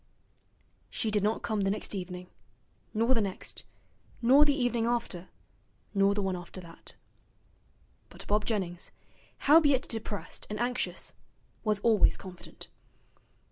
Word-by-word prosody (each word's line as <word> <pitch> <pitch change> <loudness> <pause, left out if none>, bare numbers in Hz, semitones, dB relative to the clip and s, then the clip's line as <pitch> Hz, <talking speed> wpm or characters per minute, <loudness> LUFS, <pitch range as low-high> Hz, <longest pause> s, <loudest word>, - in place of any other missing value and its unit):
She 220 - -1
did 210 -1 +2
not 210 +3 0
come 215 -2 0
the 195 - +2
next 210 +2 -1
evening, 180 -2 -6 0.6
nor 230 +4 +3
the 230 - +2
next, 195 -2 -4 0.5
nor 265 +5 +7
the 290 -1 +3
evening 240 -4 +1
after, 230 -7 -2 0.6
nor 200 0 +4
the 205 - 0
one 190 -1 0
after 175 +1 -8
that. 170 -2 -13 1.1
But - - -8
Bob 210 +1 +2
Jennings, 185 -6 -2 0.6
howbeit 285 -3 +6
depressed 220 -3 -4
and 210 0 -4
anxious, 250 +1 -2 0.5
was 215 -2 +2
always 220 -3 +4
confident. 185 -2 -11
210 Hz, 130 wpm, -30 LUFS, 190-235 Hz, 1.1 s, nor